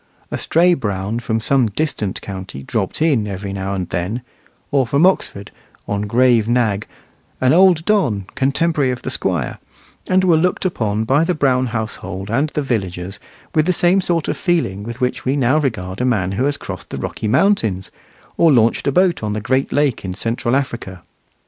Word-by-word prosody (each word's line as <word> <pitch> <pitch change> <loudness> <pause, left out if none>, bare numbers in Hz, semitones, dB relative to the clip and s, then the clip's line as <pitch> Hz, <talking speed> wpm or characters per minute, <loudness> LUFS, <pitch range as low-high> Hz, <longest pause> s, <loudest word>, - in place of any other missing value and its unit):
A - - -1
stray 175 +2 +3
Brown 105 - -2
from 115 -1 -1
some 125 +2 +2
distant 105 -4 -2
county 95 -8 -7
dropped 110 - -2
in 135 -10 +2
every 100 0 -5
now 95 0 -3
and 90 -2 -3
then; 105 +8 -3 0.5
or 135 -3 +2
from 140 +8 +3
Oxford, 105 - 0 0.4
on 100 0 -2
grave 120 -1 +3
nag, 115 -4 +1 0.5
an 130 +1 +3
old 175 -2 +5
don, 140 - +1
contemporary 140 +1 +1
of 125 -1 -4
the - - -3
Squire; - - -2 0.5
and 185 0 +3
were 175 -3 +4
looked 180 +3 0
upon 110 - 0
by 135 +7 +3
the 180 +1 0
Brown 130 -3 +2
household 105 -4 -5
and 140 +6 +1
the 150 - -2
villagers 95 -5 -3 0.3
with 155 0 +2
the 185 - +3
same 180 +3 +3
sort 170 -3 -1
of - - -1
feeling 165 - 0
with 120 +4 -7
which 125 0 -1
we 130 +2 0
now 135 +2 +3
regard 105 -8 -3
a - - +1
man 100 -7 +1
who 120 +7 0
has 145 0 0
crossed - - -8
the - - -5
Rocky 110 - -4
Mountains, 110 - +1 0.5
or 165 -2 +5
launched 115 +1 +3
a - - +3
boat 180 +2 +2
on 105 -1 -2
the 105 - -2
Great 130 +5 0
Lake 145 -4 +1
in 90 -1 -4
Central 120 +3 -1
Africa. 115 -10 -3
120 Hz, 185 wpm, -19 LUFS, 100-150 Hz, 0.5 s, old